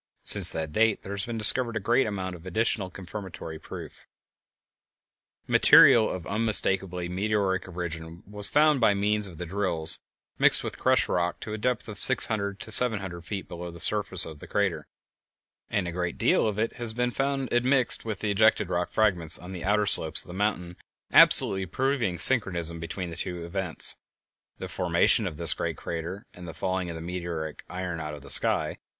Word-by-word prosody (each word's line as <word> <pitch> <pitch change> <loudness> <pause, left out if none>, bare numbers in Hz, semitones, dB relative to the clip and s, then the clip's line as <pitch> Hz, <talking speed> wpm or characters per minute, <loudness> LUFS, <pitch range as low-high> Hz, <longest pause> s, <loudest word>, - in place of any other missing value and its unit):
Since - - +8
that 80 -1 -5
date 110 +3 0
there 100 - -7
has 100 +1 -2
been 115 -1 -5
discovered 115 +2 +2
a - - -2
great 120 +5 +1
amount 95 -3 -5
of 85 - -14
additional 105 0 -1
confirmatory 90 -4 -9
proof). - - -11 1.4
Material 110 -2 +6
of 90 -2 -6
unmistakably 95 -5 0
meteoric 95 0 -2
origin 85 -1 -8
was 105 0 0
found 150 -2 +2
by 105 -3 +3
means 105 +1 +1
of 85 -4 -13
the 90 - -6
drills, 85 -3 +3 0.4
mixed - - +5
with - - -7
crushed - - +2
rock, 90 0 -2
to 105 - -7
a - - -4
depth 125 +2 -2
of 105 -2 -9
six - - +3
hundred 100 -2 -4
to 110 - -3
seven 115 0 +5
hundred 90 -3 -8
feet 100 -1 -6
below 85 0 -8
the 85 0 -12
floor 105 +4 +1 0.2
of 80 -2 -10
the - - -12
crater, - - -2 0.8
and 100 -4 -2
a - - -4
great 90 0 -4
deal - - +1
of 105 -2 -4
it 115 +1 -3
has 115 -2 -3
been 125 0 -1
found 135 0 -3
admixed 125 +1 +2
with 110 -3 -6
the 105 - -2
ejected 105 -2 +2
rock 90 0 -2
fragments 90 -7 +3
on 90 +1 -11
the 90 - -8
outer 105 +2 +1
slopes 80 -5 +2
of - - -17
the 90 - -10
mountain, 90 -3 -3 0.4
absolutely 95 -1 +5
proving 120 -3 -2
synchronism 85 -7 +3
between 85 +2 -6
the - - -8
two 85 0 -5
events, 90 -2 +1 0.6
the - - -7
formation - - +1
of 75 - -7
this - - +2
great - - -5
crater 85 +4 -7
and 90 0 -12
the 80 - -9
falling 95 +1 -3
of 85 - -7
the 80 - -8
meteoric 85 -3 -6
iron 90 -2 -5
out 75 -1 -6
of 70 - -14
the 70 - -5
sky. - - 0
95 Hz, 190 wpm, -25 LUFS, 85-110 Hz, 1.4 s, Since